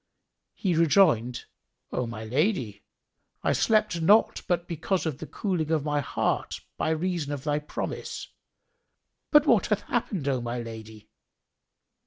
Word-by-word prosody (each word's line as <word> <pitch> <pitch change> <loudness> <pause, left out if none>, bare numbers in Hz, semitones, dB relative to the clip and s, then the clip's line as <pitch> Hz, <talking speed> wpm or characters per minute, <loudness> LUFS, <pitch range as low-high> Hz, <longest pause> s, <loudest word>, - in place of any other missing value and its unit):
He 185 -3 0
rejoined, 155 - +3 0.5
"O 125 - -1
my 110 -1 -6
lady, 125 - 0 0.6
I - - +2
slept 215 -6 +2
not 205 +7 +4
but 175 -1 0
because 175 +3 -1
of 155 -5 -3
the - - -7
cooling 180 -7 -2
of 155 -3 +1
my 145 -1 +1
heart 145 - -1 0.2
by - - -1
reason 160 -2 -1
of 140 -2 -4
thy 150 -1 0
promise. 150 - -5 1.0
But 295 -1 +6
what 230 - +4
hath 210 -1 +1
happened, 200 - -2
O 130 -3 +1
my 120 +1 -3
lady?" 110 -2 -9
155 Hz, 140 wpm, -27 LUFS, 125-185 Hz, 1.0 s, But